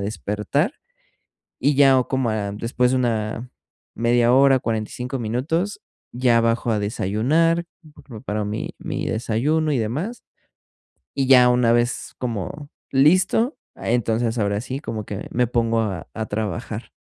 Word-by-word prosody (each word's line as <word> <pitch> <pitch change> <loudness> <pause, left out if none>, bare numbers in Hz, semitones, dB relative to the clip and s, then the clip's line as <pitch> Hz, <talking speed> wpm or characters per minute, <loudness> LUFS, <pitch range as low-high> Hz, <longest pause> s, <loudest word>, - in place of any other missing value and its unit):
despertar, 105 - -1 0.9
y 145 0 +2
ya, 135 -1 +6
o 130 - +1
como 130 -3 0
a 105 -2 -2
después 120 +4 0
de 130 - +2
una 115 0 -1 0.5
media 120 +1 +3
hora, 135 0 +5
45 120 +4 -3
minutos, 145 - -2 0.3
ya 120 -1 +3
bajo 115 0 +1
a 105 - +1
desayunar, 130 - +1 0.3
pre - - -17
preparo 110 -4 -4
mi 105 +2 -4
mi - - -4
desayuno 145 +8 0
y 135 - +1
demás, 150 - -3 0.9
y 135 -1 0
ya, 125 -2 +7
una 125 -1 +3
vez 120 +1 -1
como 125 - -4 0.2
listo, 185 - +3 0.2
ah, - - -5
entonces 115 0 0
ahora 100 0 0
sí 130 +2 -5
como 110 -7 -5
que 100 0 -6
me 125 0 +2
pongo 115 -1 +1
a 100 -5 -3
a 110 - -3
trabajar. 105 -4 -4
120 Hz, 145 wpm, -22 LUFS, 110-135 Hz, 0.9 s, ya